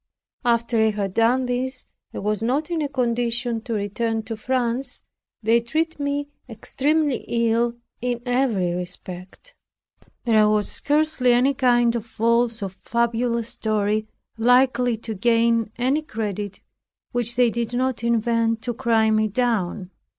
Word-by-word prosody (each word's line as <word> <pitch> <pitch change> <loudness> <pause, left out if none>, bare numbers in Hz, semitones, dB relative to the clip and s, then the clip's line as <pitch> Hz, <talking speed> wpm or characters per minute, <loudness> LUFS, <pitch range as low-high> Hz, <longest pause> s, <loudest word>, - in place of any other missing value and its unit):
After 235 -1 +1
I 220 - +4
had 200 -3 -3
done 240 +4 +3
this, 255 +1 -2 0.3
and - - -6
was 210 0 -1
not 275 +8 0
in 330 -2 0
a 290 - -1
condition 240 -2 -1
to 230 0 -4
return 220 +2 -2
to 225 +1 -5
France, 250 +2 -2 0.4
they 230 +2 +4
treated 315 +6 -2
me 285 0 -1 0.2
extremely 285 +5 0
ill 235 0 +1 0.3
in 245 -1 -2
every 245 -9 +1
respect. 180 - -7 0.7
There 215 -3 +4
was 210 -1 +1
scarcely 295 -4 +2
any 255 +3 +3
kind 240 -3 +3
of 230 - -2
false 230 0 +1
or 195 - -2
fabulous 235 +3 -1
story, 215 0 -1 0.3
likely 245 0 +3
to 225 0 -6
gain 230 +1 +2
any 260 +5 +1
credit, 210 -7 -5 0.5
which 240 -1 -1
they 245 -1 +4
did 235 0 -2
not 255 -2 -1
invent 230 -1 +1
to 240 - -2
cry 225 -1 +2
me 215 0 +2
down. 210 -5 -1
235 Hz, 140 wpm, -23 LUFS, 220-250 Hz, 0.7 s, I